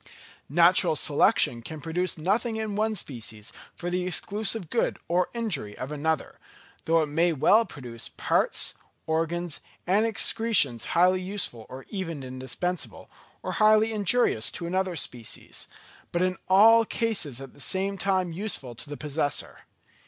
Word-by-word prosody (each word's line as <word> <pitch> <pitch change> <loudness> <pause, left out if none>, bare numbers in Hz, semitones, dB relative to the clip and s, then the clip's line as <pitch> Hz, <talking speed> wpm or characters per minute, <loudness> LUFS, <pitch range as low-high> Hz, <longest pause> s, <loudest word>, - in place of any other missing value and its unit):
Natural 170 +2 +5
selection 145 - +3
can 155 +6 -8
produce 170 +4 -1
nothing 215 +8 0
in 220 -2 -3
one 215 +1 +1
species 115 - -5 0.2
for 175 0 -4
the 180 0 -1
exclusive 200 +1 -2
good 235 - +1
or 180 +1 +1
injury 200 - -2
of 130 +3 -5
another; 155 +1 -2 0.5
though 165 0 +3
it - - -2
may 165 +4 +2
well 205 +10 +4
produce 120 - -6
parts, - - 0 0.3
organs, 165 +1 -1 0.3
and 205 +5 +3
excretions 220 - +1
highly 185 +1 +5
useful 180 - -3
or 130 +1 -9
even 165 -8 -4
indispensable, 130 +8 -4 0.3
or - - -3
highly 215 +1 +4
injurious 205 - +2
to 170 - -6
another 185 +1 -1
species, 120 -7 -4 0.4
but 175 +1 +1
in 185 0 +1
all 225 +4 +7
cases 210 - -1
at 135 -1 -10
the - - -12
same 195 +4 0
time 190 -2 0
useful 170 - -4
to 130 +5 -5
the 145 - -6
possessor. 145 -2 -2
175 Hz, 145 wpm, -27 LUFS, 145-205 Hz, 0.5 s, all